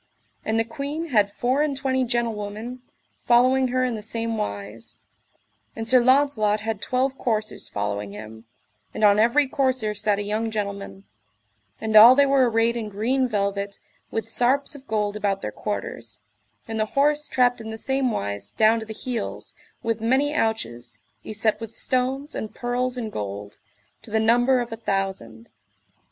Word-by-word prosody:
And 220 +1 0
the - - +3
queen 295 +6 -5
had 210 -6 +3
four 255 +6 0
and 295 -3 0
twenty 260 -1 0
gentlewomen 230 0 -3 0.4
following 255 +2 +4
her 255 +1 0
in 250 - -1
the 215 - -5
same 230 +1 -2
wise; 100 - -5 0.8
and 225 0 -4
Sir 255 +1 +6
Launcelot 255 -6 +3
had 220 -1 -3
twelve 260 +1 -1
coursers 215 -3 -2
following 100 0 -3
him, 110 +2 -10 0.5
and - - -2
on 205 0 +6
every 240 +7 +4
courser 260 -5 0
sat 205 0 0
a 205 - -2
young 215 +2 -1
gentleman, 200 -2 -5 0.8
and 220 0 -2
all 230 +4 +10
they 280 +1 +5
were 270 -3 +4
arrayed 225 +1 +2
in 225 -3 -4
green 250 +6 0
velvet, 200 -2 -2 0.3
with 225 0 -3
sarps 260 +6 +2
of 275 -2 -12
gold 210 -1 -1
about 200 -2 -1
their 105 - -3
quarters, 105 +2 -5 0.5
and 225 -1 -4
the 215 - +1
horse 295 +1 +2
trapped 245 -2 +2
in 220 - -7
the 220 - -5
same 265 +2 0
wise 100 - -3
down 220 +1 +3
to 220 - -8
the 220 - -7
heels, 245 +1 -5 0.3
with 230 -1 -1
many 265 +6 +2
ouches, 120 - -2 0.3
y - - -7
set 215 0 +1
with 225 0 -7
stones 265 +3 0
and 215 - -5
pearls 250 +1 -1
in 225 -3 -4
gold, 100 - -6 0.4
to - - -13
the 220 +1 +1
number 245 +3 +3
of 240 0 -5
a - - -3
thousand. 190 - -4
225 Hz, 170 wpm, -24 LUFS, 205-255 Hz, 0.8 s, all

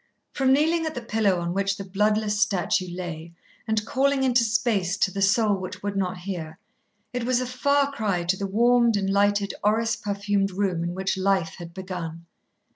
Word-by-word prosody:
From 265 -1 +2
kneeling 320 +4 +2
at 315 - -5
the 245 - -4
pillow 215 -5 +1
on 170 0 -2
which 195 +1 0
the 200 - -5
bloodless 210 +2 0
statue 185 -3 +1
lay, 170 -2 -6 0.3
and 220 -1 0
calling 270 +2 +1
into 250 -2 +3
space 210 -5 0
to 190 - +1
the 195 - -4
soul 205 +2 +3
which 185 +1 -7
would 205 0 -2
not 185 -2 -1
hear, 175 -4 -6 0.6
it 245 -1 -2
was 250 +1 +1
a 255 - -2
far 280 +3 +1
cry 205 -9 -1
to 175 +2 +1
the 195 +1 -3
warmed 235 +2 +3
and 195 -1 -1
lighted 200 0 +2
orris 220 +2 +2
perfumed 200 -1 -1
room 185 -3 -1
in 175 +1 -3
which 190 0 -1
Life 190 -3 0
had 170 -1 -8
begun. 170 -3 -6
200 Hz, 190 wpm, -25 LUFS, 185-230 Hz, 0.6 s, into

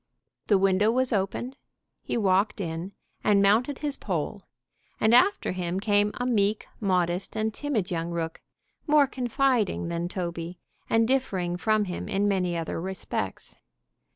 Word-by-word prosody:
The 205 - +5
window 195 +2 +3
was 255 +1 +2
opened, 215 +7 -2 0.4
he - - -2
walked 200 +1 +2
in 170 +1 -4 0.3
and 205 -1 +4
mounted 225 +8 +3
his 290 -2 -3
pole, 190 +2 -3 0.6
and 220 +1 +3
after 380 +11 +4
him 180 0 -2
came 205 0 +2
a 245 - -2
meek, 210 -3 +1
modest 180 -2 0
and 220 0 0
timid 220 -9 -2
young 165 -1 -2
rook, 165 -1 -4 0.5
more 295 -1 +6
confiding 250 - 0
than 170 0 -2
Toby, 170 -1 -4 0.3
and 225 0 +3
differing 190 -10 0
from 215 +3 +1
him 180 -2 -5
in 200 +1 +1
many 180 -3 0
other 165 0 -3
respects. 190 +1 -5
200 Hz, 145 wpm, -27 LUFS, 180-230 Hz, 0.6 s, more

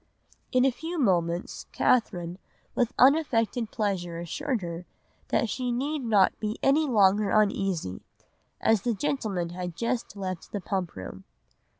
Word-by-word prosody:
"In 255 0 +4
a 270 - +4
few 325 +7 -5
moments 175 - 0
Catherine 180 -7 +1 0.3
with 245 -2 +1
unaffected 250 -5 +3
pleasure 190 -7 -2
assured 245 - -2
her 170 +1 -6 0.4
that 235 - +1
she 250 +2 -2
need 285 +6 -1
not 210 -5 +3
be 215 0 -3
any 295 +3 +4
longer 205 -3 +4
uneasy, 195 - +1 0.6
as 220 -3 +3
the 240 -2 0
gentlemen 200 -9 -1
had 175 -1 -5
just 235 -1 -2
left 185 -3 -5
the 205 - -1
Pump 190 -2 -3
room. 95 0 -8
210 Hz, 135 wpm, -27 LUFS, 180-250 Hz, 0.6 s, In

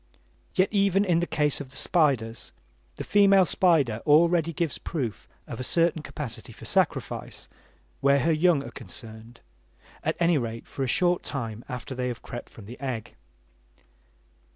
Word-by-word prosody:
Yet 185 0 +3
even 200 -1 +3
in 175 -3 +3
the 175 - -1
case 150 -2 0
of 135 - -8
the 135 - -16
spiders, 130 -7 0 0.4
the - - -5
female 195 -2 +5
spider 150 - +2
already 165 +2 +4
gives 165 -2 -2
proof 125 -10 -4 0.2
of - - -7
a - - -3
certain 165 +3 +2
capacity 150 -5 -7
for - - -12
sacrifice - - -1 0.5
where 140 0 +3
her 165 - +2
young 160 -2 +3
are - - -8
concerned, 115 0 -10 0.6
at - - -1
any 170 -3 +3
rate 115 -1 -5
for - - -8
a 135 - +1
short 175 +7 +2
time 115 -5 -5
after 125 +1 -5
they 125 0 -2
have 120 -1 -5
crept 120 - -8
from 110 - -13
the 120 +4 -10
egg. 130 -5 -4
145 Hz, 160 wpm, -26 LUFS, 120-170 Hz, 0.6 s, female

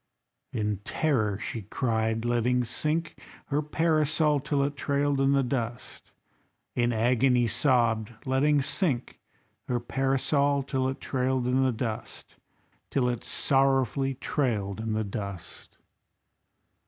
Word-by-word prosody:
In 105 -2 -1
terror 110 - 0
she 110 +2 -4
cried, 110 +1 -1
letting 120 +1 +2
sink 155 +7 -2 0.3
her 145 +1 +1
Parasol 155 -1 +2
till 145 0 0
it 145 +1 -2
trailed 140 0 0
in 135 0 +3
the 140 -1 +3
dust; 120 -1 -4 0.6
In 120 0 +2
agony 120 +2 +3
sobbed, 115 -2 +2
letting 140 +2 +2
sink 135 -6 -1 0.5
her 125 -1 0
Parasol 135 +3 +1
till 130 -1 -1
it 135 - -5
trailed 130 -1 0
in 130 +2 +2
the 130 - +2
dust, 115 -1 -6 0.5
Till 130 -3 +1
it 120 -2 -3
sorrowfully 135 -1 +1
trailed 110 -8 -1
in 110 0 -2
the 110 0 0
dust. 100 -3 -7
130 Hz, 120 wpm, -27 LUFS, 115-140 Hz, 0.6 s, in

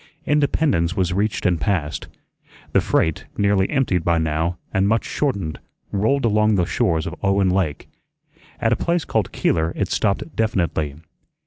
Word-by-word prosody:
Independence 145 - +1
was 90 -1 +1
reached 105 +3 -1
and 90 -3 +2
passed; 85 -8 -1 0.6
the - - +4
freight, 80 -2 0
nearly 100 -1 +2
emptied 125 - +1
by 85 0 +2
now, 80 +2 -1 0.2
and 95 +1 +2
much 115 +2 +1
shortened, 100 - -2 0.3
rolled 110 +7 +1
along 105 -1 +3
the 90 -3 +2
shores 85 -1 0
of - - -4
Owen 100 -2 +2
Lake. 90 -7 -1 0.7
At - - +2
a - - +2
place 170 -1 0
called 110 -5 -1
Keeler 80 +1 0
it - - -1
stopped 105 +9 -1
definitely. 85 -9 0
95 Hz, 150 wpm, -21 LUFS, 85-110 Hz, 0.7 s, the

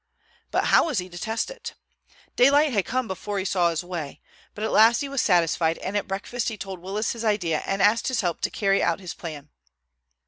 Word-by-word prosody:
But - - +1
how - - +6
was 295 -8 -2
he 180 -1 -2
to 175 - -10
test 225 - -2
it? - - -8 0.6
Daylight 280 +3 +5
had 200 -4 +1
come 255 -1 -1
before 200 +1 -4
he 190 - -2
saw 180 -3 +2
his 165 0 -2
way; 170 -5 -6 0.4
but 210 - -5
at 220 - -1
last 225 +4 +5
he 285 - -2
was 275 -3 0
satisfied, 165 -1 +2
and 190 - -5
at 205 - -1
breakfast 200 +6 -3
he 220 - -6
told 195 -2 -7
Willis 195 +5 -2
his 230 -1 -5
idea 185 -8 0
and 195 0 0
asked 215 +3 +3
his 255 -4 0
help 175 -4 -2
to - - 0
carry 195 -1 +1
out 170 +1 +1
his 180 -3 -7
plan. 150 -4 -8
195 Hz, 220 wpm, -25 LUFS, 175-230 Hz, 0.6 s, how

